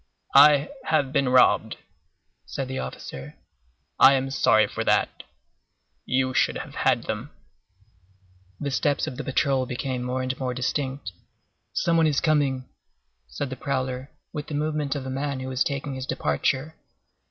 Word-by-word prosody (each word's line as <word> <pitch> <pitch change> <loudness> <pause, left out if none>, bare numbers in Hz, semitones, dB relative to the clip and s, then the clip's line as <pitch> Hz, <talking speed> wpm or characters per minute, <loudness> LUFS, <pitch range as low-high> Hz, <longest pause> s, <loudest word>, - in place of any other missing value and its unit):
"I 145 +1 +7 0.2
have 145 -4 +1
been 140 -3 +2
robbed," 125 0 +4 0.7
said 135 - -4
the 130 0 -4
officer; 70 +2 -7 0.6
"I 135 +1 +8
am 135 0 0
sorry 135 - +4
for - - -4
that. - - +1 0.9
You 130 0 +1
should - - +2
have - - -8
had - - +1
them." - - -4 1.3
The 140 - -3
steps 145 +2 +1
of 125 - -6
the - - -4
patrol 135 -1 +1
became 125 0 -3
more 125 +1 -2
and 130 0 -2
more 130 -2 -2
distinct. 130 -2 -2 0.6
"Some 170 -1 +1
one 165 -1 +4
is 145 -2 +2
coming," 140 -4 +1 0.6
said 130 - -5
the - - -3
prowler, 130 0 -3 0.2
with 150 -2 -5
the 150 - -4
movement 150 -1 -1
of 135 -2 -4
a 130 - -4
man 140 0 -2
who 130 0 -5
is 130 0 +2
taking 140 0 -3
his 130 0 -5
departure. 130 - -1
135 Hz, 155 wpm, -25 LUFS, 130-145 Hz, 1.3 s, I